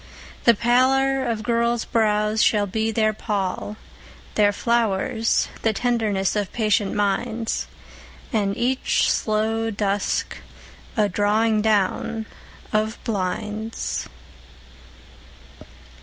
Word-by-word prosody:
The 235 - +7
pallor 265 +4 +3
of 230 -3 -2
girls' 235 0 +1
brows 215 -1 +1
shall 210 -2 +3
be 220 +3 -1
their 215 -1 +2
pall; 205 0 -3 0.6
Their 205 -1 +4
flowers 225 0 +1
the 225 - +1
tenderness 215 -4 0
of 205 -2 -1
patient 210 -3 +1
minds, 220 +3 -1 0.7
And 200 -3 0
each 255 +2 +1
slow 220 +1 0
dusk 205 -1 -1 0.6
a 210 -1 +4
drawing 210 +2 +2
down 220 +1 0 0.5
of 215 +1 0
blinds. 210 +1 -3
220 Hz, 95 wpm, -23 LUFS, 205-230 Hz, 0.7 s, The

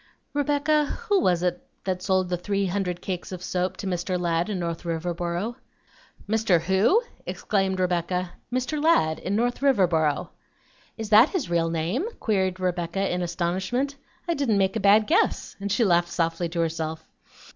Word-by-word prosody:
"Rebecca, 290 +1 +2
who 405 +5 0
was 180 - +2
it 180 -1 0 0.2
that 185 -1 -2
sold 185 -1 +1
the 180 - +1
three 200 +3 -1
hundred 180 -2 -2
cakes 185 -1 -4
of 180 -1 -6
soap 185 +1 -1
to - - -6
Mr. 180 0 -1
Ladd 170 +2 0
in 205 - -2
North 170 -2 -3
Riverboro?" 175 +6 -3 0.7
"Mr. 215 -5 +3
WHO?" 190 - +3 0.2
exclaimed 195 -2 -1
Rebecca. 180 0 -1 0.2
"Mr. 255 +4 -1
Ladd, 160 - +3
in 195 - -2
North 245 +4 0
Riverboro." 175 - +2 0.7
"Is 220 -2 -6
that 220 +6 +8
his 310 - -3
real 165 -1 +2
name?" 165 - -1
queried 190 -4 0
Rebecca 180 +1 -1
in 180 - -1
astonishment. 190 +11 -1 0.3
"I 340 - +2
didn't 275 -9 +1
make 195 +1 +1
a - - 0
bad 205 +2 +5
guess;" 330 - +1
and 200 0 -3
she 230 - +3
laughed 175 -2 +3
softly 165 +1 -1
to 170 0 -1
herself. 160 -1 -3
185 Hz, 165 wpm, -25 LUFS, 175-215 Hz, 0.7 s, that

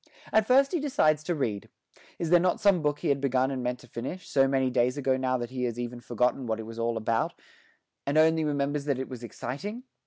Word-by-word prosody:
At 220 -1 +4
first 270 +2 +5
he 350 - 0
decides 255 - +2
to 175 - 0
read. 110 -9 -2 0.5
Is 165 -1 -3
there 175 - +7
not 180 +1 +1
some 200 -5 +4
book 145 -1 0
he - - 0
had 140 -1 +1
begun 130 -1 +1
and 130 -2 -3
meant 125 0 -2
to - - -15
finish, 165 +10 -6
so 135 -1 +3
many 135 -1 +1
days 125 +2 +1
ago 135 -2 +1
now 130 -1 0
that 120 0 -5
he 125 -1 -2
has 120 0 -3
even 120 0 -4
forgotten 125 +2 0
what 110 0 -1
it 110 - -6
was 115 +1 -8
all 115 0 0
about, 115 +1 0 0.7
and 145 +2 +1
only 160 0 +4
remembers 145 -1 -1
that 140 -3 0
it 130 - -4
was 125 -3 -7
exciting? 185 - -6
135 Hz, 240 wpm, -28 LUFS, 125-160 Hz, 0.7 s, there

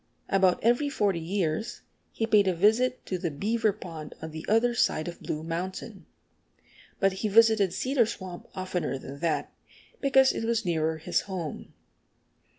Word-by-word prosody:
About 190 -2 +3
every 245 +6 +3
forty 205 -10 0
years 175 +4 -2 0.3
he 225 - -1
paid 210 -3 +4
a 185 - +2
visit 225 +7 +2
to 185 - -3
the 170 - -1
Beaver 215 +8 0
Pond 165 -6 -9
on 160 - -7
the 160 0 -7
other 230 +3 +3
side 155 -8 +1
of 170 - -7
Blue 155 0 -4
Mountain. 170 +3 -5 0.9
But 195 -1 +3
he 220 - +1
visited 220 -2 +5
Cedar 255 0 +1
Swamp 185 -5 -7
oftener 185 -6 -2
than 135 +1 -9
that, 165 -1 -1 0.5
because 265 -1 +5
it - - -3
was 230 -1 0
nearer 160 -2 0
his 170 +3 0
home. 175 -5 -5
190 Hz, 155 wpm, -28 LUFS, 165-225 Hz, 0.9 s, visited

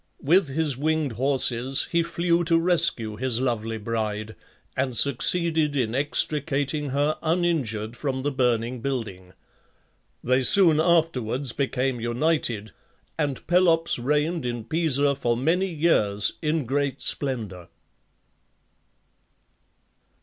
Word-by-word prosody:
With 170 +4 +3
his 140 -1 -2
winged 155 -1 -1
horses 130 +1 +1
he 170 -1 +2
flew 170 +1 0
to 165 0 +3
rescue 165 -11 +1
his 125 -1 0
lovely 115 -3 -2
bride, 110 -1 -4 0.4
and 130 -2 0
succeeded 150 +3 +3
in 120 -5 -1
extricating 145 +1 0
her 145 +3 -1
uninjured 155 -11 -1
from 130 -1 -3
the 145 +2 -2
burning 125 -2 -1
building. 105 -9 -5 0.9
They 130 +1 +1
soon 160 +4 +6
afterwards 145 -7 0
became 130 -2 -2
united, 120 -3 -1 0.5
and 145 -4 -3
Pelops 170 -4 +2
reigned 150 +5 -1
in 120 -2 -4
Pisa 145 0 +1
for 120 -4 -1
many 175 +8 0
years 110 -11 +2
in 155 -2 -1
great 140 +1 -2
splendour. 110 - -2
135 Hz, 110 wpm, -24 LUFS, 120-160 Hz, 0.9 s, soon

